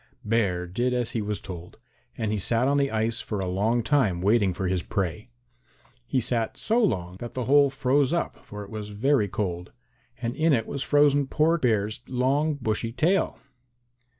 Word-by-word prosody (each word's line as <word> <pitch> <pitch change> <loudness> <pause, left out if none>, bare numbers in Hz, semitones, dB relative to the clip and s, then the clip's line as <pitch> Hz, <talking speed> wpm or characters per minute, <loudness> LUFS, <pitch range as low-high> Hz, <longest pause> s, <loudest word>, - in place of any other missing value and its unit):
Bear 100 -5 +1
did 120 +8 -1
as 120 -2 -1
he 115 - -2
was 105 0 -3
told, 90 -2 -9 0.4
and 110 -2 -1
he 105 - -1
sat 115 +6 +2
on 140 +1 +2
the 140 -1 +2
ice 110 0 0
for 105 - -4
a 95 - -2
long 105 +6 0
time 110 -11 +2
waiting 100 +1 +3
for 95 +1 -3
his 90 -1 0
prey. 95 +5 -3 0.8
He 130 - +1
sat 115 -1 -1
so 230 +2 +1
long 90 - -1
that 120 +3 -7
the 125 -2 -3
hole 140 +2 +5
froze 135 +1 +1
up, 170 0 -2
for 105 0 -8
it 100 - -12
was 105 -1 -6
very 110 +2 +1
cold, 90 -3 -3 0.5
and 120 0 -3
in 160 0 +3
it 115 -4 +1
was 140 - -4
frozen 145 -1 +3
poor 160 +4 +2
Bear's 110 -3 0
long 135 +5 +1
bushy 115 -3 -2
tail. 165 +10 +1
115 Hz, 185 wpm, -26 LUFS, 100-135 Hz, 0.8 s, hole